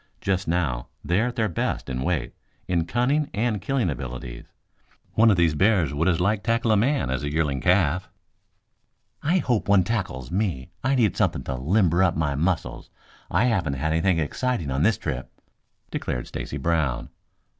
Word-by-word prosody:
Just 95 Hz, 0 st, -1 dB
now 80 Hz, -8 st, -1 dB, 0.2 s
they 90 Hz, +4 st, +2 dB
are 120 Hz, -, +1 dB
at 125 Hz, -, -5 dB
their 110 Hz, -1 st, +1 dB
best, 85 Hz, -, -2 dB
in 65 Hz, -2 st, -3 dB
weight, 70 Hz, -4 st, -1 dB, 0.3 s
in 85 Hz, -3 st, +1 dB
cunning 135 Hz, -, +1 dB
and 105 Hz, -2 st, 0 dB
killing 125 Hz, +2 st, 0 dB
abilities. 65 Hz, -4 st, -5 dB, 0.7 s
One 115 Hz, +1 st, +5 dB
of 100 Hz, -, +4 dB
these 85 Hz, -3 st, +3 dB
bears 90 Hz, -4 st, +2 dB
would 80 Hz, +5 st, 0 dB
as 85 Hz, -3 st, +2 dB
lief 100 Hz, +3 st, +1 dB
tackle 115 Hz, 0 st, +1 dB
a -, -, +5 dB
man 105 Hz, -, +1 dB
as 65 Hz, -, -1 dB
a 75 Hz, 0 st, -3 dB
yearling 75 Hz, -4 st, 0 dB
calf." 90 Hz, 0 st, +2 dB, 1.1 s
"I 170 Hz, +5 st, +2 dB
hope 120 Hz, -, 0 dB
one 100 Hz, -2 st, +6 dB
tackles 90 Hz, -, -3 dB
me. 90 Hz, -10 st, -2 dB
I 135 Hz, +2 st, +2 dB
need 115 Hz, -6 st, +2 dB
something 65 Hz, -, 0 dB
to 65 Hz, -, -3 dB
limber 85 Hz, -, +2 dB
up 90 Hz, -3 st, +3 dB
my 75 Hz, -3 st, 0 dB
muscles. 80 Hz, +4 st, -2 dB, 0.4 s
I 95 Hz, +6 st, +2 dB
haven't 95 Hz, -, +1 dB
had 80 Hz, +4 st, -1 dB
anything 80 Hz, +3 st, +2 dB
exciting 80 Hz, -, -1 dB
on 70 Hz, +2 st, 0 dB
this -, -, +3 dB
trip," -, -, -4 dB, 0.6 s
declared -, -, -3 dB
Stacy 70 Hz, -, -5 dB
Brown. 75 Hz, -4 st, 0 dB
90 Hz, 175 wpm, -25 LUFS, 70-110 Hz, 1.1 s, one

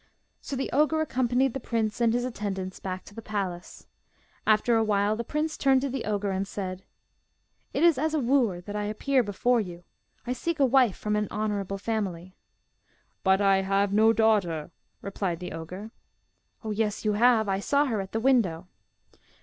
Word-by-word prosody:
So 275 Hz, -, -5 dB
the 270 Hz, -, -3 dB
ogre 305 Hz, +3 st, +3 dB
accompanied 255 Hz, -3 st, +1 dB
the 270 Hz, -, -3 dB
prince 225 Hz, -2 st, -2 dB
and 230 Hz, -1 st, +4 dB
his 245 Hz, +1 st, 0 dB
attendants 195 Hz, -6 st, -4 dB
back 185 Hz, -1 st, -5 dB
to -, -, -13 dB
the 225 Hz, -, -8 dB
palace. 195 Hz, -5 st, -5 dB, 0.6 s
After 220 Hz, +2 st, +4 dB
a 225 Hz, -, +3 dB
while 205 Hz, 0 st, +1 dB
the 235 Hz, -, -3 dB
prince 305 Hz, +5 st, -2 dB
turned 265 Hz, -1 st, +3 dB
to 275 Hz, -, -1 dB
the 265 Hz, -2 st, -3 dB
ogre 205 Hz, -1 st, -1 dB
and 190 Hz, +1 st, -2 dB
said: 185 Hz, -2 st, -5 dB, 0.9 s
'It -, -, 0 dB
is 335 Hz, -6 st, +5 dB
as 315 Hz, +2 st, 0 dB
a -, -, +2 dB
wooer 240 Hz, -8 st, +1 dB
that 205 Hz, +3 st, -7 dB
I 210 Hz, 0 st, -2 dB
appear 255 Hz, +6 st, +1 dB
before 235 Hz, +3 st, +1 dB
you. 175 Hz, -3 st, -8 dB, 0.4 s
I 250 Hz, -, -1 dB
seek 330 Hz, +5 st, -3 dB
a 275 Hz, -, +5 dB
wife 255 Hz, -5 st, +3 dB
from 210 Hz, 0 st, -1 dB
an 210 Hz, 0 st, 0 dB
honourable 205 Hz, -2 st, -2 dB
family.' 195 Hz, -4 st, -3 dB, 0.9 s
'But 190 Hz, +1 st, +3 dB
I 195 Hz, -1 st, +4 dB
have 195 Hz, +1 st, +1 dB
no 220 Hz, +2 st, +5 dB
daughter,' 200 Hz, -8 st, +1 dB, 0.3 s
replied 195 Hz, -4 st, -3 dB
the 180 Hz, 0 st, -6 dB
ogre. 180 Hz, +7 st, -7 dB, 0.7 s
'Oh, 220 Hz, -, -3 dB
yes 210 Hz, 0 st, -1 dB
you 210 Hz, -, +2 dB
have, 225 Hz, 0 st, +4 dB
I 195 Hz, 0 st, 0 dB
saw 285 Hz, +8 st, +2 dB
her 225 Hz, -7 st, -1 dB
at 190 Hz, -, -8 dB
the 225 Hz, -, -1 dB
window. 215 Hz, -9 st, +2 dB
215 Hz, 185 wpm, -27 LUFS, 195-245 Hz, 0.9 s, is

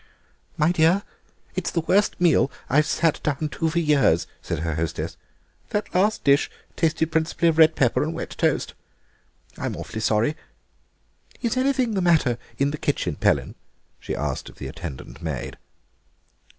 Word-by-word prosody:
"My 155 Hz, +3 st, +3 dB
dear, 175 Hz, +4 st, +3 dB, 0.5 s
it's -, -, -2 dB
the 170 Hz, -, -1 dB
worst 195 Hz, +6 st, +2 dB
meal 165 Hz, -6 st, +4 dB, 0.2 s
I've 150 Hz, +3 st, +4 dB
sat 165 Hz, -2 st, +1 dB
down 150 Hz, +1 st, -1 dB
to 160 Hz, +2 st, -1 dB
for 160 Hz, -, -3 dB
years," 145 Hz, -, +3 dB, 0.2 s
said -, -, -3 dB
her 80 Hz, -1 st, -1 dB
hostess; 80 Hz, +1 st, -3 dB, 0.5 s
"that 210 Hz, -, -2 dB
last 205 Hz, +4 st, +2 dB
dish 140 Hz, 0 st, +4 dB, 0.3 s
tasted 160 Hz, 0 st, +1 dB
principally 160 Hz, +1 st, +2 dB
of 160 Hz, 0 st, 0 dB
red 160 Hz, 0 st, +7 dB
pepper 125 Hz, -4 st, +2 dB
and 160 Hz, +2 st, -2 dB
wet -, -, -5 dB
toast. -, -, 0 dB, 0.9 s
I'm -, -, -2 dB
awfully 110 Hz, -, -6 dB
sorry. 110 Hz, +7 st, +2 dB, 1.1 s
Is 235 Hz, 0 st, +1 dB
anything 255 Hz, -3 st, +1 dB
the 195 Hz, -, 0 dB
matter 155 Hz, -9 st, +3 dB, 0.2 s
in 140 Hz, +1 st, +1 dB
the 150 Hz, -, -5 dB
kitchen, 90 Hz, -, -1 dB
Pellin?" -, -, +1 dB, 0.5 s
she -, -, -4 dB
asked -, -, -3 dB
of -, -, -15 dB
the -, -, -7 dB
attendant 70 Hz, +3 st, -8 dB
maid. 80 Hz, -6 st, -4 dB
155 Hz, 155 wpm, -24 LUFS, 135-170 Hz, 1.1 s, red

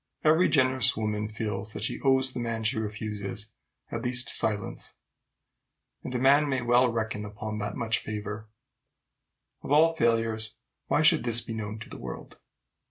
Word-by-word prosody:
Every 160 Hz, +4 st, +4 dB
generous 130 Hz, -5 st, +4 dB
woman 105 Hz, -1 st, -1 dB
feels 105 Hz, -1 st, -4 dB
that 105 Hz, -, -5 dB
she -, -, -2 dB
owes 130 Hz, -1 st, +3 dB
the -, -, -4 dB
man 115 Hz, -1 st, -3 dB
she 110 Hz, 0 st, +1 dB
refuses 105 Hz, 0 st, -5 dB, 0.4 s
at 115 Hz, -, -3 dB
least 125 Hz, 0 st, +1 dB
silence; 105 Hz, -2 st, -1 dB, 1.1 s
and 125 Hz, -, -5 dB
a -, -, +2 dB
man 140 Hz, +3 st, +4 dB
may 130 Hz, -2 st, -1 dB
well 120 Hz, +1 st, +4 dB
reckon 110 Hz, -2 st, -3 dB
upon 105 Hz, +1 st, -6 dB
that 100 Hz, 0 st, -4 dB
much 115 Hz, -1 st, +1 dB
favor. 105 Hz, 0 st, -6 dB, 1.1 s
Of -, -, -7 dB
all 160 Hz, +3 st, +5 dB
failures, 115 Hz, -5 st, 0 dB, 0.3 s
why 155 Hz, -, +2 dB
should 160 Hz, 0 st, +5 dB
this 120 Hz, -1 st, +2 dB
be 115 Hz, -, -6 dB
known 110 Hz, -1 st, -5 dB
to 110 Hz, -, -9 dB
the -, -, -8 dB
world? -, -, -8 dB
115 Hz, 165 wpm, -28 LUFS, 105-130 Hz, 1.1 s, all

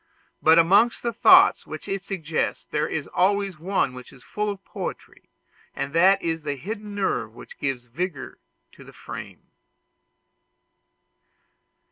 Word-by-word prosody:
But 160 Hz, +1 st, +6 dB
amongst 200 Hz, +8 st, +4 dB
the 235 Hz, -1 st, -1 dB
thoughts 225 Hz, -, +6 dB
which -, -, -8 dB
it 195 Hz, 0 st, -2 dB
suggests 165 Hz, -6 st, -3 dB
there 150 Hz, 0 st, -1 dB
is 150 Hz, -, -3 dB
always 195 Hz, -2 st, 0 dB
one 175 Hz, -6 st, 0 dB
which 125 Hz, 0 st, -11 dB
is 125 Hz, -, -17 dB
full 210 Hz, 0 st, -3 dB
of 200 Hz, -1 st, -7 dB
poetry, -, -, -8 dB, 0.5 s
and 140 Hz, +1 st, -4 dB
that 190 Hz, +4 st, +5 dB
is 165 Hz, -1 st, -2 dB
the 145 Hz, -2 st, -3 dB
hidden 205 Hz, -, -7 dB
nerve 115 Hz, -, -2 dB
which -, -, -13 dB
gives 135 Hz, -3 st, -2 dB
vigor 145 Hz, +3 st, -5 dB, 0.3 s
to -, -, -15 dB
the -, -, -15 dB
frame. -, -, -10 dB
170 Hz, 140 wpm, -24 LUFS, 145-200 Hz, 0.5 s, But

